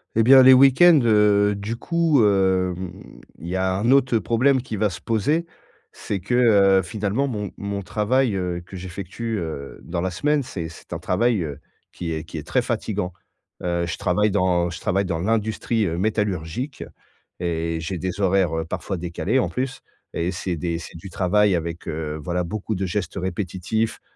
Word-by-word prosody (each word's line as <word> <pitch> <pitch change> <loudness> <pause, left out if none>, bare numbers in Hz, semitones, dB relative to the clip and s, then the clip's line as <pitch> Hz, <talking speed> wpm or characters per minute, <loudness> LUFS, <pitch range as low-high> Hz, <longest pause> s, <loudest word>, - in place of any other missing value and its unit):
Et 115 - +4
bien, 130 +2 +8
les 130 - +9
week-ends, 140 +5 +7
heu, 105 -2 +4
du 105 +3 -4
coup, 165 -5 +2
hem, 95 -2 +2 0.6
il 85 - -8
y 90 - -3
a 95 0 +1
un 115 +6 +1
autre, 130 -3 +4
heu, - - +4
problème 130 +3 +2
qui 115 - -6
va 105 0 +1
se 85 - -8
poser, 145 - 0 0.5
c'est 100 - -4
que, 120 - -4 0.5
heu, - - +1
finalement, 105 +8 -2
mon 105 -4 -4
mon 100 0 -4
travail, 110 +3 +1
heu, 90 -2 -2
que 95 +2 -12
j'effectue, 95 +5 -5
heu, 75 -4 -6
dans 85 0 -4
la 95 0 -1
semaine, 145 - +1
c'est 85 -9 -5
c'est 80 - -14
un - - -3
travail, 110 +1 +1
heu, 70 -3 -6 0.3
qui 85 -2 -5
est 80 +1 -4
qui 80 0 -8
est 75 - -6
très - - +1
fatiguant, 90 -1 -3 0.5
heu, 85 -1 0
je 85 - -4
travaille 105 +3 +1
dans 90 -3 +2
je 85 - -8
travaille 100 +2 0
dans 85 -2 -2
l'industrie, 110 +2 0
heu, 85 -1 -2
métallurgique 105 - -2 0.6
et 85 -1 -2
j'ai 80 +3 -4
des 90 +3 -4
horaires, 95 -3 +2
heu, 80 - -3
parfois 95 +3 -4
décalés, 90 +8 -1
en - - +1
plus 130 +1 -4 0.3
et 85 +2 -1
c'est 90 -1 -3
des 85 0 -2
c'est 85 - -9
du 90 +4 -10
travail 100 +2 +2
avec, 85 0 -4
heu, 75 -1 -4
voilà, 90 +3 -2
beaucoup 110 +4 -4
de 95 +1 -2
gestes 90 0 -3
répétitifs, 95 +3 -2
95 Hz, 190 wpm, -23 LUFS, 85-110 Hz, 0.6 s, les